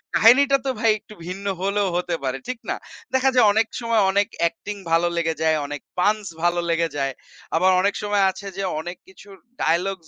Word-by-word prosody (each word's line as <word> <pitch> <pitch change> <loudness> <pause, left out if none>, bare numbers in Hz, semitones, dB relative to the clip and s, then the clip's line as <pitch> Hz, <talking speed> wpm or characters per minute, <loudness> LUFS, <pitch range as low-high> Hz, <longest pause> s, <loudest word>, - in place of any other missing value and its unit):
কাহিনীটা 275 +5 +6
তো - - 0
ভাই 225 0 +4
একটু 215 - -15
ভিন্ন 190 +3 -6 0.2
হলেও 200 +1 +1
হতে 180 -1 -1
পারে, 130 0 -1
ঠিক 255 -2 -4
না? - - 0 0.4
দেখা 260 0 +3
যায় 245 - +6
অনেক 220 +1 +2
সময় 230 -2 +2
অনেক 200 +1 +2
অ্যাক্টিং 170 +5 -1 0.2
ভালো 165 +1 +3
লেগে 165 -1 +1
যায়, 160 -1 +3
অনেক 145 -1 -6 0.2
পাঞ্চ 210 +3 +2 0.2
ভালো 175 0 +2
লেগে 165 0 +2
যায়। 135 -1 -1 0.4
আবার 185 +3 +4
অনেক 200 +1 +2
সময় 205 -1 +2
আছে 200 +1 -10
যে 195 - -2 0.2
অনেক 175 +3 -6
কিছুর 195 +1 -15 0.3
ডায়ালগস 175 +1 0
195 Hz, 190 wpm, -23 LUFS, 170-210 Hz, 0.4 s, কাহিনীটা